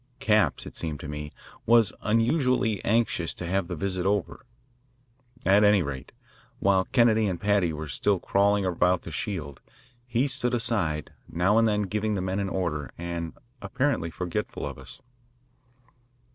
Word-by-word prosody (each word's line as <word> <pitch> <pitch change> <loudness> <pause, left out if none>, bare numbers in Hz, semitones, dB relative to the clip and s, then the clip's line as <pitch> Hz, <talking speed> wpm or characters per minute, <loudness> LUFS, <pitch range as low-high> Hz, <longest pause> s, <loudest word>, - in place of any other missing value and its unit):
Capps, 105 - +2
it - - -10
seemed 80 -3 -4
to - - -7
me, 75 0 -6 0.4
was 115 -2 +5
unusually 115 - +1
anxious 110 -6 +1
to 90 - -6
have 95 +1 0
the 90 - -4
visit 95 +1 -1
over. 100 +5 -1 1.0
At 100 +3 +5
any 105 -3 +5
rate, 70 -3 -6 0.5
while 95 -1 +2
Kennedy 110 -2 +3
and 90 -3 -2
Paddy 100 -4 +2
were 80 0 -5
still 95 +9 +1
crawling 100 +1 +2
about 90 0 +1
the 80 - -8
shield, 75 -5 -4 0.5
he 120 +3 +1
stood 125 -2 -1
aside, 90 -10 -1 0.2
now 95 +6 +2
and 115 - +4
then 105 -1 +1
giving 105 +2 -1
the 95 - -1
men 95 +1 -1
an 100 -1 -1
order 85 -7 -2
and 85 -1 -5 0.2
apparently 105 - -1
forgetful 90 +1 -4
of - - -6
us. - - -11
95 Hz, 155 wpm, -26 LUFS, 85-110 Hz, 1.0 s, was